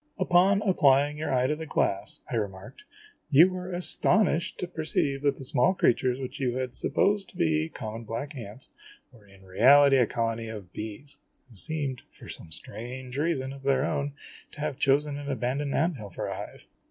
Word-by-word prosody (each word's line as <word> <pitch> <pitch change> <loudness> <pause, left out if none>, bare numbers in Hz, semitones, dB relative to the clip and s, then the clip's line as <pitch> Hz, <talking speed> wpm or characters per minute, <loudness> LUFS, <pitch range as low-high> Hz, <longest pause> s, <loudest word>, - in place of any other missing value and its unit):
"Upon 190 +2 +3
applying 145 -6 +3
your 155 - -2
eye 130 -1 +2
to 150 +3 +1
the 160 +1 -7
glass," 100 -7 -1
I - - -1
remarked, 100 - -5 0.4
"you 165 +6 +7
were 185 0 -6
astonished 175 0 +2
to 180 - -4
perceive 155 -4 -1
that 140 -1 +2
the - - -9
small 130 +8 +3
creatures 125 -3 +2
which 130 +3 -6
you 125 -2 -1
had 130 -1 -3
supposed 200 +7 0
to - - -16
be 160 -2 +1
common 115 -4 -7
black 125 +7 -5
ants 115 +1 -9 0.4
were 110 -5 -19
in 100 -1 -19
reality 135 +9 +6
a 125 -3 +4
colony 115 -1 -2
of 105 -5 -9
bees, 110 +7 -7 0.3
who - - -16
seemed, 140 - -2
for - - -15
some 80 - -9
strange 125 - -7
reason 140 -4 -1
of 140 - -11
their 135 0 +2
own, 145 -3 -2 0.4
to - - -12
have 145 -2 -3
chosen 145 +1 +2
an 145 0 -6
abandoned 135 +2 -2
ant 160 +1 +1
hill 105 -3 -8
for 90 - -5
a - - -4
hive - - -9
135 Hz, 190 wpm, -27 LUFS, 120-155 Hz, 0.4 s, you